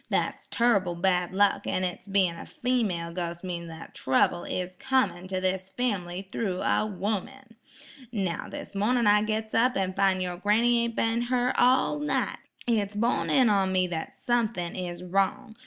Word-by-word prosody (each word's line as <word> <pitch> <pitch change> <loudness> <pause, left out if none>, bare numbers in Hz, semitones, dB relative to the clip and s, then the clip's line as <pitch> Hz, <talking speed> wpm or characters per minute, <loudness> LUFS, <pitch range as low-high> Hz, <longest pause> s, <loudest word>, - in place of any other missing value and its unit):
That's - - -1
turrible 200 -7 +2
bad 180 0 +1
luck; 200 +1 +2
an' 185 - 0
its 180 +2 -4
bein' 190 -4 +2
a - - -9
female 205 -10 -1
ghos' 170 0 -4
means 170 -2 -4
that 165 0 -10
trouble 155 +6 +1
is 185 0 -4
comin' 260 -7 0
to 185 0 -2
this 185 0 -1
family 190 -5 -3
thro' 190 -5 -2
a 215 - +1
'ooman. 220 +5 -4 0.6
Now, 190 -7 -2
this - - -8
mornin' 230 +4 +2
I 210 0 +5
gits 220 0 -2
up 250 +3 +3
an 190 -1 0
fin' 195 -1 +2
yer 180 -1 -3
granny 235 +4 +3
ain't 230 -1 -4
been 225 +1 +1
her 250 0 +2
all 260 +4 +3
night. 295 - -1 0.3
It's 210 -4 0
borne 230 +4 +1
in 260 -3 +5
on 195 -2 +2
me 185 -1 +2
that 160 -2 -5
sumthin' 225 -7 -1
is 175 -1 -5
wrong. 195 +6 0
195 Hz, 170 wpm, -27 LUFS, 180-235 Hz, 0.6 s, I